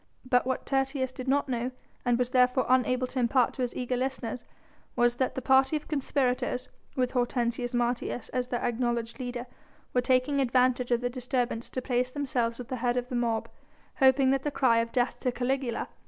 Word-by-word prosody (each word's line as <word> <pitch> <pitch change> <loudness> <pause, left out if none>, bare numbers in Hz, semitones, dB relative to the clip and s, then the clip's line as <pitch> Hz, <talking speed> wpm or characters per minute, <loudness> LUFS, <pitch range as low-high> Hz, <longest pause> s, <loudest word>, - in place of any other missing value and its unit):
But 250 0 +2
what 260 - -2
Tertius 270 -1 0
did 255 0 -8
not 280 +2 +2
know, 245 -1 -1 0.3
and 245 -1 +2
was 250 0 0
therefore 250 0 +3
unable 255 0 +2
to 255 +1 -4
impart 245 +1 +3
to 260 - -5
his 245 -1 -2
eager 250 0 -1
listeners 255 -1 -3 0.5
was 240 0 +2
that 260 - 0
the 260 - -4
party 265 +2 +4
of 300 - -4
conspirators, 260 -3 -1 0.3
with 250 -1 +1
Hortensius 245 -1 -1
Martius 240 0 -1
as 250 -1 -2
their 245 -1 -2
acknowledged 235 0 -1
leader, 245 -1 -4 0.5
were 250 - +3
taking 255 +3 +2
advantage 250 -1 +2
of 240 -1 +2
the 245 - 0
disturbance 250 -2 -2
to 255 - -4
place 250 -1 0
themselves 255 -4 -1
at 250 - -7
the 255 - -2
head 245 +1 0
of 250 0 -2
the 250 - -3
mob, 230 -2 0 0.5
hoping 265 0 +5
that 270 -1 +1
the 295 - -1
cry 255 -5 +3
of 230 0 -1
"Death 245 -1 0
to 250 - 0
Caligula!" 250 -1 -1
250 Hz, 195 wpm, -28 LUFS, 245-260 Hz, 0.5 s, hoping